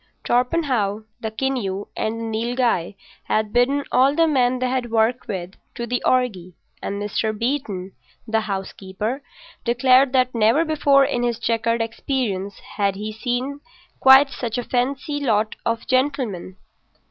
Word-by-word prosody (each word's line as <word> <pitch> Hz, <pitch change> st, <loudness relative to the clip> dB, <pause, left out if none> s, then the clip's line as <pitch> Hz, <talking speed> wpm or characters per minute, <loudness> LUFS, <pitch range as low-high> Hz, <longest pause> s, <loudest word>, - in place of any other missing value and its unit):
Torpenhow, 245 Hz, -6 st, +1 dB, 0.2 s
the 220 Hz, -, -3 dB
Keneu, 220 Hz, -5 st, -2 dB
and 220 Hz, +1 st, -2 dB
the -, -, -4 dB, 0.2 s
Nilghai 235 Hz, -6 st, 0 dB, 0.3 s
had 215 Hz, -1 st, 0 dB
bidden 270 Hz, +4 st, +2 dB
all 270 Hz, +3 st, +4 dB
the 330 Hz, 0 st, +4 dB
men 255 Hz, -4 st, +2 dB
they 255 Hz, 0 st, 0 dB
had 250 Hz, -1 st, -1 dB
worked 225 Hz, +2 st, +1 dB
with 185 Hz, -3 st, -4 dB, 0.2 s
to 235 Hz, -, -3 dB
the 245 Hz, +1 st, -2 dB
orgy; 195 Hz, -9 st, 0 dB, 0.3 s
and 200 Hz, -, -3 dB
Mr. 210 Hz, +1 st, -2 dB
Beeton, 225 Hz, -7 st, -2 dB, 0.4 s
the 225 Hz, 0 st, +2 dB
housekeeper, 200 Hz, +4 st, -4 dB, 0.4 s
declared 255 Hz, +2 st, +4 dB
that 255 Hz, -1 st, +2 dB
never 230 Hz, +8 st, +3 dB
before 285 Hz, -3 st, +4 dB
in 245 Hz, -, -1 dB
his 240 Hz, -2 st, 0 dB
checkered 230 Hz, 0 st, 0 dB
experience 225 Hz, -5 st, -3 dB, 0.2 s
had 200 Hz, -2 st, +1 dB
he 210 Hz, +2 st, -5 dB
seen 250 Hz, +5 st, -3 dB, 0.4 s
quite 265 Hz, +1 st, +7 dB
such 235 Hz, -2 st, -4 dB
a 245 Hz, -, -2 dB
fancy 270 Hz, +4 st, -1 dB
lot 220 Hz, -6 st, +1 dB
of 230 Hz, 0 st, -1 dB
gentlemen. 255 Hz, -9 st, -1 dB
240 Hz, 145 wpm, -22 LUFS, 215-260 Hz, 0.4 s, quite